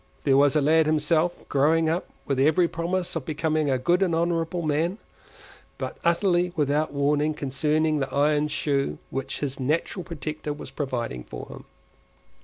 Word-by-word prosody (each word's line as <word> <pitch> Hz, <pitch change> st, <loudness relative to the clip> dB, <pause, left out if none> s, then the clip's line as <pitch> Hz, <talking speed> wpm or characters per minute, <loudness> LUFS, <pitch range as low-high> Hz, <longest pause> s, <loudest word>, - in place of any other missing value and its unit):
There 135 Hz, -2 st, +3 dB
was 140 Hz, 0 st, +5 dB
the 150 Hz, -, +4 dB
lad 160 Hz, +2 st, +4 dB
himself—growing 155 Hz, 0 st, +2 dB
up 165 Hz, +3 st, -1 dB, 0.2 s
with 140 Hz, -2 st, -1 dB
every 160 Hz, +5 st, +4 dB
promise 175 Hz, +2 st, -2 dB
of 165 Hz, -, -2 dB
becoming 155 Hz, 0 st, 0 dB
a 130 Hz, -, +2 dB
good 175 Hz, +9 st, +1 dB
and 180 Hz, -4 st, +2 dB
honourable 170 Hz, +1 st, 0 dB
man—but 160 Hz, +6 st, -5 dB
utterly 175 Hz, +1 st, +2 dB
without 150 Hz, 0 st, +1 dB
warning 145 Hz, +2 st, +1 dB
concerning 150 Hz, +2 st, 0 dB
the 135 Hz, -1 st, -2 dB
iron 150 Hz, +2 st, +2 dB
shoe 145 Hz, -2 st, -1 dB
which 135 Hz, 0 st, -4 dB
his 140 Hz, -2 st, -3 dB
natural 155 Hz, +7 st, -1 dB
protector 155 Hz, -2 st, -5 dB
was 145 Hz, -, -9 dB
providing 120 Hz, -, -3 dB
for -, -, -8 dB
him. -, -, -10 dB
155 Hz, 150 wpm, -25 LUFS, 140-165 Hz, 0.2 s, was